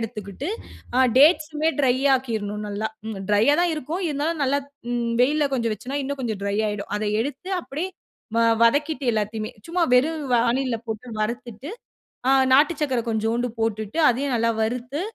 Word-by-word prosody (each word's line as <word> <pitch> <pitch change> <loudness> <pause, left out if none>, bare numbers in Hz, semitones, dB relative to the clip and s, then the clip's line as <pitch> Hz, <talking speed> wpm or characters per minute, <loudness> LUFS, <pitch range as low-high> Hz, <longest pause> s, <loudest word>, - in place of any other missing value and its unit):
எடுத்துக்கிட்டு 215 - -6 0.5
அ - - +5 0.2
டேட்ஸுமே 305 +1 +4
ட்ரை 255 -3 +4 0.2
ஆக்கிருணும் 215 -5 -2
நல்லா. 205 +2 -2 0.4
ட்ரையா 215 +8 +4
தான் 350 -1 +2
இருக்கும். 310 +6 -4
இருந்தாலும் 305 +2 -1
நல்லா 275 +1 +2 0.6
வெயில்ல 290 +3 +3
கொஞ்சம் 230 -3 0
வச்சோனா 265 +7 -5
இன்னும் 280 +1 -4
கொஞ்சம் 220 -5 -3
ட்ரை 200 0 -1
ஆயிடும். 205 -1 -4
அத 215 - -2 0.2
எடுத்து 285 +8 -6
அப்டியே 330 +5 -4 0.5
வ - - +4 0.2
வதக்கிட்டு 290 +5 +2
எல்லாத்தையுமே. 215 +1 -2 0.2
சும்மா 350 +1 0
வெறும் 305 +5 +2
வாணில்ல 240 +1 +2
போட்டு 220 +2 -5
வறுத்துட்டு. 235 +3 -4 0.6
ஆ - - +5 0.2
நாட்டு 295 +5 +5
சர்க்கரை 260 -5 +1
கொஞ்சோண்டு 225 +2 0
போட்டுட்டு 220 +4 -2
அதையும் 265 +2 0
நல்லா 230 0 +2
வறுத்து 250 +6 -3
250 Hz, 145 wpm, -23 LUFS, 220-290 Hz, 0.6 s, அ